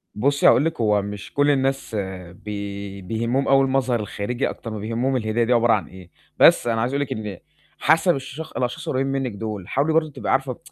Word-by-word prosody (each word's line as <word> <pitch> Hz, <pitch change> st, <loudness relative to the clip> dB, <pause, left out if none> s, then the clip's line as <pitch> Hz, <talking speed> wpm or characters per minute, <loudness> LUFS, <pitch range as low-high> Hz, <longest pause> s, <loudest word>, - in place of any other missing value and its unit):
بُصّي 140 Hz, +6 st, +3 dB
هاقول 125 Hz, +6 st, +5 dB
لكِ، 165 Hz, -7 st, -2 dB
هو 105 Hz, -2 st, +3 dB
مش 100 Hz, 0 st, -7 dB
كل 145 Hz, +1 st, +3 dB
الناس 135 Hz, -3 st, -1 dB, 0.4 s
بي 100 Hz, 0 st, -6 dB
بيهمّهم 115 Hz, +7 st, -1 dB
أوي 135 Hz, 0 st, +5 dB
المظهر 130 Hz, -3 st, +1 dB
الخارجي 105 Hz, +4 st, -2 dB
أكتر 115 Hz, -, -7 dB
ما 110 Hz, -, -5 dB
بيهمّهم 115 Hz, +5 st, -1 dB
الهدية 115 Hz, 0 st, 0 dB
دي 125 Hz, +2 st, +2 dB
عبارة 120 Hz, -1 st, +4 dB
عن 95 Hz, -7 st, -1 dB
إيه. 90 Hz, 0 st, -13 dB, 0.3 s
بس -, -, +6 dB
أنا 115 Hz, -1 st, +1 dB
عايز 125 Hz, +4 st, -1 dB
أقول 140 Hz, -, 0 dB
لِك 140 Hz, -, -3 dB
إن 105 Hz, -4 st, -6 dB, 0.4 s
حَسَب 160 Hz, +2 st, +4 dB
الشخ 140 Hz, +4 st, -7 dB
الأشخاص 140 Hz, +6 st, -3 dB
القريّبين 135 Hz, 0 st, 0 dB
منِّك 135 Hz, -3 st, -1 dB
دُول، 105 Hz, -3 st, -6 dB
حاولي 145 Hz, +4 st, +1 dB
برضه 155 Hz, -1 st, +2 dB
تبقي 135 Hz, -, -3 dB
عارفة 135 Hz, -1 st, 0 dB
120 Hz, 200 wpm, -23 LUFS, 105-135 Hz, 0.4 s, بس